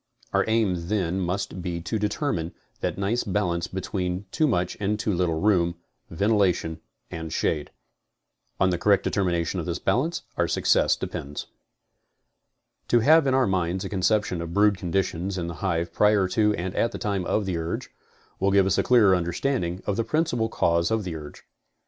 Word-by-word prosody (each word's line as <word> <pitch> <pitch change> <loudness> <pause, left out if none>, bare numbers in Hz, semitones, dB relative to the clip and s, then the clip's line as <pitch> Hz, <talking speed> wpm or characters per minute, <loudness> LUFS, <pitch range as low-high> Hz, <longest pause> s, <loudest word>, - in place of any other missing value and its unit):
Our - - +3
aim 100 -7 +1
then 95 -3 0
must 95 +1 -3
be 85 -1 -3
to 110 +6 -2
determine 105 - -2 0.2
that - - -2
nice 100 +5 0
balance 90 -4 -1
between 95 0 -3
too 155 -1 +2
much 90 -8 0
and 105 +1 0
too 105 -1 0
little 85 -3 0
room, 90 -3 +2 0.3
ventilation 90 -4 +1 0.3
and 80 -1 -6
shade. 75 -2 -1 0.9
On 95 -1 +3
the 90 - -1
correct 100 0 +3
determination 90 -2 0
of 85 - -4
this 85 0 -1
balance 155 - 0
our - - +2
success - - +3
depends. 70 +1 -5 1.4
To 120 - +4
have 155 +3 +5
in 130 - +3
our 130 -1 +4
minds 95 0 -1
a - - -4
conception 95 -2 +1
of 85 +1 -6
brood 105 0 +4
conditions 95 0 -2
in 85 - -2
the 85 - -4
hive 85 -3 -1
prior 105 -1 +3
to 105 +1 +2
and 90 +2 -4
at 115 - +1
the - - -5
time 100 -4 -1
of 105 +3 0
the 90 -3 -2
urge, 80 0 -4 0.5
will 95 - +2
give 100 -1 +4
us 95 - +2
a - - +5
clearer 110 -7 +5
understanding 90 +1 -1
of 100 - -1
the 115 - +1
principal 120 -6 0
cause 85 -4 +1
of 110 -1 0
the 90 -3 -5
urge. 75 -2 -9
95 Hz, 180 wpm, -25 LUFS, 85-105 Hz, 1.4 s, have